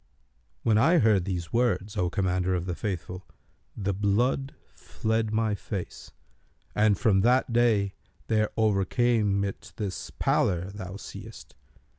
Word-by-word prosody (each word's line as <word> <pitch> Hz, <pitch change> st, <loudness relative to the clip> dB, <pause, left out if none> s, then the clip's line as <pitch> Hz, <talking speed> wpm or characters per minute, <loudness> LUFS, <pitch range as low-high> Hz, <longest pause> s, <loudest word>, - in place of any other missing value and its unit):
When 110 Hz, -1 st, +3 dB
I 165 Hz, +10 st, +5 dB
heard 105 Hz, -, +3 dB
these 90 Hz, -4 st, -4 dB
words, 110 Hz, -4 st, +1 dB
O 90 Hz, -3 st, 0 dB
Commander 95 Hz, 0 st, 0 dB
of 90 Hz, -1 st, -2 dB
the 90 Hz, -, -2 dB
Faithful, 90 Hz, -1 st, -5 dB, 0.5 s
the 100 Hz, -1 st, -1 dB
blood 115 Hz, +8 st, 0 dB, 0.2 s
fled 110 Hz, 0 st, -2 dB
my 110 Hz, -1 st, +1 dB
face, 100 Hz, -2 st, -6 dB, 0.6 s
and 105 Hz, -2 st, +3 dB
from 105 Hz, -6 st, +3 dB
that 125 Hz, +2 st, +3 dB
day 110 Hz, -5 st, +3 dB, 0.3 s
there 110 Hz, -1 st, +1 dB
overcame 105 Hz, 0 st, +2 dB
it 100 Hz, +2 st, -6 dB
this 100 Hz, -3 st, -4 dB
pallor 90 Hz, +1 st, +1 dB
thou 95 Hz, -2 st, -7 dB
seest. 100 Hz, -, -10 dB
105 Hz, 130 wpm, -27 LUFS, 95-110 Hz, 0.6 s, I